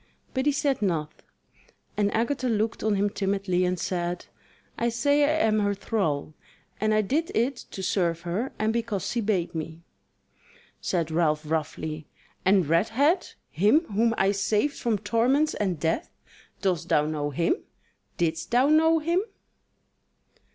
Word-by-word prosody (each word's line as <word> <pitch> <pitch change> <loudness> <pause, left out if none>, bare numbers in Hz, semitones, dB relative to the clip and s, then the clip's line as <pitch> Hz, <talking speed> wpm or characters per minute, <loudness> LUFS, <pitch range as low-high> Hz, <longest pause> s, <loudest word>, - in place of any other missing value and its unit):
But 260 +2 0
he - - +5
said 280 -3 0
naught, 160 -6 -2 0.7
and 205 -1 +1
Agatha 250 +3 0
looked 220 0 -1
on 215 -1 +2
him 200 +1 +2
timidly 195 -2 0
and 180 0 0
said: 175 -1 -2 0.5
"I 235 - 0
say 285 +5 +2
I 310 -1 +2
am 215 -1 +2
her 205 -1 +1
thrall, 185 -9 -2 0.5
and 215 +1 +1
I 215 0 +4
did 305 +11 -1
it 245 +5 +1
to 190 - -8
serve 170 -3 0
her 180 +10 -2
and 215 +1 0
because 220 -5 -2
she 235 +3 -1
bade 200 -5 0
me." 160 +1 -6 1.0
Said 165 -3 -1
Ralph 155 -2 +1
roughly: 155 0 -3 0.4
"And 190 -2 +4
Redhead, 225 - +2 0.2
him 210 - +4
whom 225 +2 +2
I 195 +1 +3
saved 210 +7 0
from 230 -3 +1
torments 245 +9 +2
and 185 -6 -1
death; 165 - -1 0.5
dost 180 -5 0
thou 150 - +3
know 150 -1 -2
him? 165 - +1 0.6
didst 165 0 -1
thou 250 +4 +3
know 320 +1 +5
him?" 335 +4 +1
205 Hz, 150 wpm, -26 LUFS, 170-240 Hz, 1.0 s, he